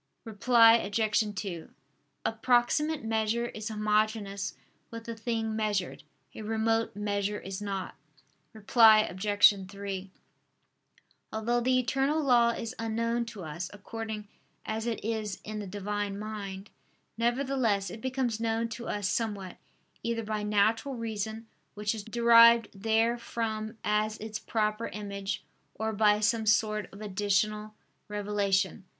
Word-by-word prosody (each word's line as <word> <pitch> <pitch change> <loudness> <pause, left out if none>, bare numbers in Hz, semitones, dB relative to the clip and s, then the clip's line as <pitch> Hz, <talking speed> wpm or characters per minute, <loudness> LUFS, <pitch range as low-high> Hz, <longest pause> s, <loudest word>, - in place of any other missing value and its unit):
Reply 230 +1 +6
Obj. 210 0 0
2: 185 -4 -5 0.6
A - - +2
proximate 245 +6 +2
measure 225 +1 0
is 215 0 -6
homogeneous 210 -1 0 0.3
with 230 0 -8
the 230 - -5
thing 225 -1 -2
measured; 210 -4 -1 0.3
a - - -8
remote 225 0 0
measure 205 0 -1
is 195 +1 -6
not. 195 -2 -4 0.6
Reply 220 0 +6
Obj. 205 -1 +3
3: 195 -1 -6 1.2
Although 235 +2 0
the 255 +1 +3
eternal 270 +4 +1
law 245 -5 +4
is 230 0 -3
unknown 230 +1 -1
to 215 -5 -8
us 170 +3 -5
according 215 0 -6 0.4
as 220 +1 -3
it 225 -3 -3
is 220 -2 -2
in 215 0 -5
the 205 - -5
Divine 205 +1 -3
Mind: 205 -2 -6 0.4
nevertheless, 240 -3 0
it 220 - -8
becomes 255 -3 -1
known 230 0 0
to 235 +1 -7
us 205 -2 -1
somewhat, 205 -5 -2 0.4
either 230 0 -2
by 215 0 -2
natural 215 +6 +1
reason 220 -1 -4 0.3
which 210 +1 -1
is 215 -2 -6
derived 230 0 +6
therefrom 225 +1 -1
as 215 +1 +1
its 215 0 -5
proper 215 0 -1
image; 200 -2 -5 0.3
or 220 0 -2
by 210 0 +4
some 220 +1 +1
sort 215 0 +2
of 195 - -12
additional 210 +1 0 0.3
revelation. 200 -2 0
215 Hz, 130 wpm, -29 LUFS, 205-230 Hz, 1.2 s, Reply